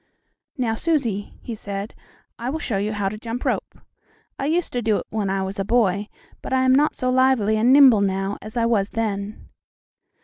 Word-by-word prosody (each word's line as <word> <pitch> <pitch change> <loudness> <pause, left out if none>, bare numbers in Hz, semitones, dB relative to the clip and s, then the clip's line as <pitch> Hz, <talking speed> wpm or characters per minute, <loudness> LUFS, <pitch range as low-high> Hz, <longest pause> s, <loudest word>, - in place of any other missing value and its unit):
"Now, 240 -4 0
Susie," 230 - -1
he 235 - -5
said, 200 -1 -5 0.5
"I 240 +2 -3
will 300 - -2
show 230 -9 -2
you 205 +2 -1
how 205 -2 -1
to 210 +2 -4
jump 230 +2 -5
rope. - - -2 0.6
I 275 - -1
used 335 +3 0
to 245 - -1
do 215 -2 +1
it - - -5
when 210 -3 -1
I 195 0 -1
was 195 +2 -5
a - - +1
boy, 205 -2 +1 0.3
but - - -7
I 260 0 +2
am 260 0 +4
not 290 +3 +3
so 255 0 -1
lively 255 -5 +3
and 225 +4 +3
nimble 265 -6 +7
now 195 0 -1
as 215 +3 -8
I 230 - +2
was 210 -4 +1
then." 210 -2 -4
220 Hz, 205 wpm, -22 LUFS, 200-255 Hz, 0.6 s, nimble